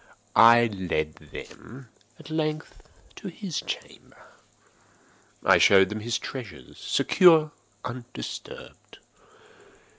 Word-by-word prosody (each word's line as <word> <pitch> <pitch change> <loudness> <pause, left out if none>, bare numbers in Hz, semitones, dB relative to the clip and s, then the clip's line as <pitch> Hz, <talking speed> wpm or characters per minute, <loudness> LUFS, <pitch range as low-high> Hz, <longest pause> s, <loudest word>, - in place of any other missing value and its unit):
I 115 +1 +7
led 90 -7 -3 0.2
them, 125 +1 -11 0.3
at 155 -1 -13
length, 155 0 -3 0.4
to - - -8
his 190 -7 -5
chamber. - - -10 1.1
I - - +5
showed 95 -1 +5
them 105 - -5
his 120 +3 -2
treasures, 105 - -9
secure, 160 -5 +4 0.3
undisturbed. 120 - -9
120 Hz, 90 wpm, -25 LUFS, 100-155 Hz, 1.1 s, I